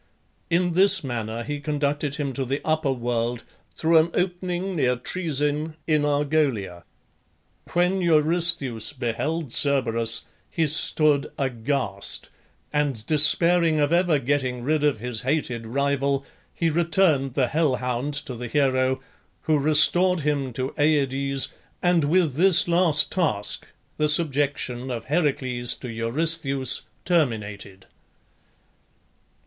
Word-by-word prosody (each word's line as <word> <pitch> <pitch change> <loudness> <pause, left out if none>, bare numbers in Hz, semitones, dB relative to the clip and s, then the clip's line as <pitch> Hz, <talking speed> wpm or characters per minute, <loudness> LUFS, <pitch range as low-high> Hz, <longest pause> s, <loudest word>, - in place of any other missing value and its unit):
In 175 0 +1
this 190 +1 +4
manner 115 -3 -4
he 145 +3 -5
conducted 145 -1 -2
him 145 -3 -3
to 135 - -3
the 135 +3 -2
upper 155 -3 0
world, 120 -1 -2 0.3
through 165 0 +3
an 160 +2 +1
opening 180 +1 -2
near 125 -5 +1
Troezen 150 +1 -2
in 155 -2 +1
Argolia. 145 - -1 0.9
When 180 +2 +1
Eurystheus 155 -7 +2
beheld 140 +4 -3
Cerberus 115 -5 0 0.3
he 165 - 0
stood 150 -1 +2
aghast, 120 -5 -3 0.4
and 140 -7 -1
despairing 165 +2 +4
of 145 +2 +1
ever 175 -3 +3
getting 130 -2 -2
rid 150 +2 0
of 145 -5 +2
his 120 -2 -4
hated 125 -4 -2
rival, 140 +2 -1 0.3
he 165 -1 -1
returned 160 -5 +1
the 130 -4 +1
hell 150 -2 +1
hound 125 +3 -3
to 130 - -6
the 120 0 -6
hero, 130 -1 +1 0.4
who 155 -2 +1
restored 155 +5 +4
him 140 -3 -1
to 130 +3 -3
Aides, 140 -2 +1 0.3
and 175 -4 +3
with 165 -1 +2
this 175 +4 +4
last 170 -3 +3
task 145 - -1 0.3
the 150 0 +1
subjection 140 -5 0
of 120 -3 -5
Heracles 130 -6 0
to 125 - -8
Eurystheus 135 +3 +1 0.2
terminated. 105 - -2
145 Hz, 120 wpm, -24 LUFS, 125-160 Hz, 0.9 s, this